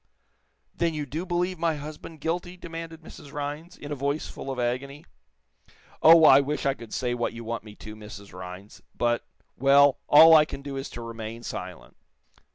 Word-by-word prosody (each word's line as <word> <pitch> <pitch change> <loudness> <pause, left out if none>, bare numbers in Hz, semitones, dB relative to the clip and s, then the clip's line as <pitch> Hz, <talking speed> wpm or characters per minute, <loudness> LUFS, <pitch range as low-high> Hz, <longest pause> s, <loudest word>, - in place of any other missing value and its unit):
"Then 165 -2 -1
you 150 -1 -3
do 160 +7 -5
believe 180 0 -1
my 165 -1 +1
husband 150 +1 -9
guilty?" 175 +3 -3
demanded 165 -1 -8
Mrs. 145 -2 -12
Rhinds, 150 +4 -6
in 145 - -9
a - - -1
voice 140 +3 -2
full - - -8
of 135 - -4
agony. 130 +4 -3 1.0
"Oh, 165 0 +8
I 135 -2 +9
wish 145 +1 -2
I 135 - +3
could 115 -4 -12
say 125 -2 -1
what 120 -1 -2
you 115 0 -8
want 115 0 -4
me 105 -1 -12
to, 110 0 -10
Mrs. 100 -2 -11
Rhinds, 90 +2 -10 0.2
but 120 0 +1 0.4
well, 140 +1 +5
all 160 +2 +9
I 155 -1 +7
can 140 - -8
do 140 -1 -6
is 135 +1 -5
to 120 - -8
remain 115 0 -7
silent." 90 -5 -7
140 Hz, 185 wpm, -26 LUFS, 120-160 Hz, 1.0 s, I